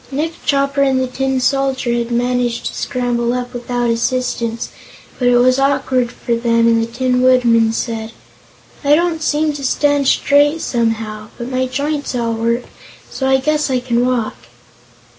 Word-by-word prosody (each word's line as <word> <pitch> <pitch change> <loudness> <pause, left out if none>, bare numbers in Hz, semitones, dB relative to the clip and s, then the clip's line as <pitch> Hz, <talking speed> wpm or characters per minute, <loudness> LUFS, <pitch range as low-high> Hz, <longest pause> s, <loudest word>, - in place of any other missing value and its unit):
Nick 305 +4 -2
Chopper 275 0 +1
and 270 -1 +2
the 260 - +1
Tin 265 +1 -1
Soldier 260 -1 0
had 235 0 -1
managed 245 0 -1
to - - -3
scramble 245 -2 -1
up 250 0 -4
without 245 -1 -1
assistance, 230 -1 -1 0.5
but 250 - +1
it 245 0 +5
was 255 +2 +4
awkward 265 -3 +1
for 240 - -3
them 230 0 +2
and 230 0 +3
the 225 - -1
Tin 250 +1 0
Woodman 240 -3 +4
said: 225 -1 -3 0.7
"I 290 +1 +5
don't 335 -1 0
seem 305 0 +1
to 285 -1 -7
stand 285 +1 +1
straight, 290 +4 +3
somehow. 225 -3 -2
But 240 +1 -6
my 255 0 0
joints 285 +1 -2
all 230 -1 -1
work, 230 +2 -1 0.5
so 265 - -2
I 265 - +5
guess 300 +2 0
I 255 -1 +1
can 245 -1 0
walk." 245 - -1
250 Hz, 165 wpm, -17 LUFS, 235-275 Hz, 0.7 s, it